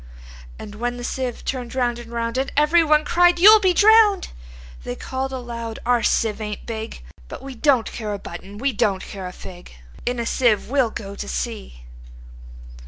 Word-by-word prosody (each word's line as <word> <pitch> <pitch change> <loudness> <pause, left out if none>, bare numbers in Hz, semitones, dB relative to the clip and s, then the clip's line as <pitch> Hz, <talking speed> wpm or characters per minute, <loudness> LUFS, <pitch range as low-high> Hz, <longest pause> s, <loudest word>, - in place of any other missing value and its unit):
And 205 - -9
when 245 +3 -3
the 245 - -7
sieve 250 -1 -4
turn'd 250 -2 -4
round 240 -2 0
and 235 -1 -11
round, 230 0 -3
And 270 - -2
every 305 +3 +4
one 305 -1 +3
cried, 350 +2 +4
"You 410 +5 +9
'll - - +5
be 380 -3 +3
drown'd!"They 125 - +2
call'd 265 - -4
aloud, 235 -3 -6
"Our 245 -1 +2
sieve 225 -1 0
ain't 210 -1 -6
big:But 220 - -8
we 270 0 -7
don't 255 -2 +2
care 215 -3 -5
a 205 - -3
button; 200 +1 -10
we 270 +4 -1
don't 195 -2 0
care 190 -2 -7
a - - -7
fig:In 175 - -8
a 235 - -2
sieve 230 -2 +1
we 280 -1 +3
'll 240 - +1
go 200 -2 -7
to - - -7
sea!" - - -5
235 Hz, 180 wpm, -22 LUFS, 200-270 Hz, -, You